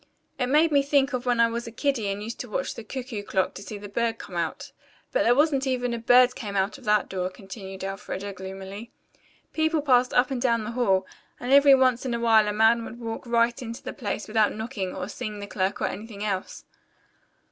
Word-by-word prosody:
It 250 - +1
made 305 +5 +4
me 285 -1 +5
think 280 -1 +2
of 255 0 -3
when 240 -1 +2
I 230 - +7
was 235 +1 -4
a - - -6
kiddie 245 -3 -1
and 200 +1 -3
used 225 +2 -6
to 245 - -6
watch 270 +6 -2
the 230 - -8
cuckoo 245 -1 -5
clock 190 -2 -1
to - - -9
see 205 +1 -7
the 205 0 -8
bird 230 +2 -1
come 180 - -10
out. 170 -2 -3 0.4
But - - +1
there 240 - +4
wasn't 280 -1 +2
even 245 -2 0
a 235 - -3
bird 245 +2 +5
came 210 -6 -6
out 195 +1 0
of - - -16
that 210 -1 +3
door," 185 -1 -2
continued 190 0 -9
Elfreda 195 0 -5
gloomily. 195 +3 -8 0.6
"People 315 -1 +1
passed 250 -3 +4
up 250 +2 +3
and 255 -2 -2
down 235 -3 +2
the 215 - -4
hall, 195 -6 +2 0.3
and 245 - -4
every 280 -1 +8
once 255 -2 +2
in 250 -3 -1
a - - -2
while 225 -2 +4
a - - +1
man 225 +2 +4
would 235 +1 -9
walk 230 +1 -6
right 235 +1 +2
into 230 0 -7
the - - -5
place 210 -3 -4
without 215 -1 +2
knocking, 220 -4 -4
or 185 -1 -4
seeing 210 0 -6
the 205 - -6
clerk, 200 0 -2
or - - 0
anything 210 -1 -5
else. 195 -3 -3
230 Hz, 230 wpm, -26 LUFS, 205-250 Hz, 0.6 s, every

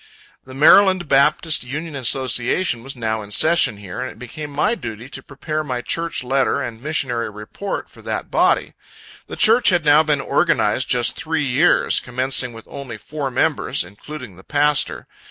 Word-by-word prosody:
The 130 0 -11
Md. 185 +4 +5
Baptist 150 +2 +2
Union 150 +5 -6
Association 130 +2 0
was 135 +3 -7
now 110 -2 -2
in 105 - -10
session 155 0 +3
here, 100 -3 -8
and 130 - -4
it - - -13
became 135 +6 -8
my 145 +10 +1
duty 115 - -7
to - - -7
prepare 155 +2 -5
my 125 -4 -3
church 165 -4 -2
letter 135 +1 +1
and 115 -1 -6
missionary 130 -5 -1
report, 105 - -6
for - - -16
that - - -5
body. - - +2 0.5
The - - -7
church 230 +3 +5
had 175 -4 +1
now 150 +1 +6
been 150 -2 0
organized 135 -5 +1
just 120 -1 +2
three 160 -3 -2
years; 140 +7 +2
commencing 130 0 -1
with 115 -1 -12
only 130 -5 -8
four 140 +5 -5
members, 125 - 0
including 105 - -11
the 95 - -15
pastor. 145 +2 +1
135 Hz, 170 wpm, -20 LUFS, 120-155 Hz, 0.5 s, now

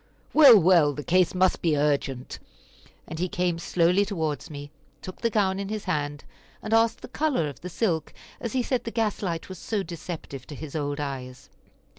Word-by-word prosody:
"Well, 275 -7 +9
well, 165 -4 +5
the 145 - -6
case 180 +2 +2
must 185 0 +2
be 160 -3 +2
urgent," 140 -3 -1 0.7
and 160 - -6
he 180 +1 -1
came 175 -1 -1
slowly 180 +3 +2
towards 160 -8 -3
me, 145 -1 -8 0.3
took 185 - -9
the 230 - +2
gown 195 -3 +1
in 200 0 -4
his 215 -1 -4
hand, 145 -5 -2 0.4
and 215 - -2
asked 225 0 +3
the - - -8
color 265 - 0
of 140 -2 -9
the 180 - -6
silk, 170 -4 -1 0.3
as 235 - -4
he 255 -1 +1
said 255 0 -1
the - - -4
gas 225 -3 -1
light 170 -5 -3
was 185 -2 -9
so 210 -3 -2
deceptive 160 -6 -7
to 150 - -8
his 150 0 -8
old 145 -1 -2
eyes. 130 -3 -6
175 Hz, 195 wpm, -26 LUFS, 150-205 Hz, 0.7 s, Well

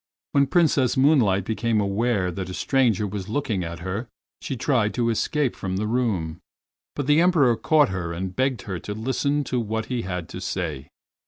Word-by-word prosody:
When 140 -1 +3
Princess 145 -8 +2
Moonlight 120 - +4
became 110 0 0
aware 100 -1 0
that 95 +1 -5
a 90 - -5
stranger 120 -6 +2
was 100 -1 -5
looking 110 -6 -1
at 85 0 -6
her 95 +6 -4 0.3
she 130 - -4
tried 115 -4 +1
to 115 -1 +1
escape 140 +3 0
from 95 -1 -3
the 105 - -1
room, 105 -9 -1 0.6
but 145 - -2
the 150 +3 +4
Emperor 155 -9 +4
caught 150 +2 +3
her 90 -3 -3
and 90 +2 -4
begged 130 0 0
her 95 -5 -4
to 105 +5 -6
listen 140 +6 0
to 125 -2 -1
what 110 -1 -2
he 120 - 0
had 90 -4 -4
to 90 - -7
say. 85 -7 -3
110 Hz, 185 wpm, -24 LUFS, 95-130 Hz, 0.6 s, Moonlight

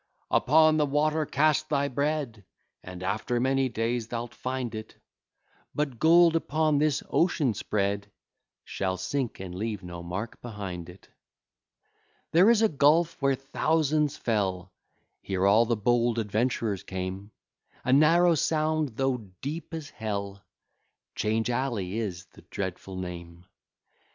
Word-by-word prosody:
"Upon 155 +2 +5
the 150 - +3
water 150 +2 +1
cast 155 +1 +2
thy 140 -1 +1
bread, 140 -5 -2 0.4
And 90 0 -8
after 110 +5 -1
many 135 +1 +1
days 115 0 -2
thou'lt 120 0 -5
find 130 -2 -4
it;" 110 0 -7 0.8
But 140 -6 -2
gold, 165 +1 +6
upon 155 -2 +1
this 150 -1 +1
ocean 155 -8 +2
spread, 100 0 -2 0.5
Shall 95 -1 -2
sink, 130 +6 -3
and 95 -2 -7
leave 105 +1 -4
no 85 -1 -7
mark 95 +7 -6
behind 95 -7 -6
it: 90 +2 -15 1.2
There 175 +7 +6
is 230 -1 +4
a - - +6
gulf, 155 +1 +2
where 135 -1 +3
thousands 150 +2 0
fell, 95 -6 -1 0.5
Here 95 -1 -1
all 110 +4 +5
the 120 -1 +1
bold 120 +2 +2
adventurers 110 -2 -1
came, 95 +2 -5 0.6
A 130 - +3
narrow 165 +5 +5
sound, 155 -4 0
though 135 -1 +1 0.2
deep 155 +5 -5
as 160 -3 -6
Hell 100 -3 -5 0.7
'Change 110 +2 0
Alley 115 -6 -2
is 90 -5 -4
the - - -15
dreadful 95 0 -5
name. 85 -1 -7
120 Hz, 130 wpm, -27 LUFS, 100-150 Hz, 1.2 s, gold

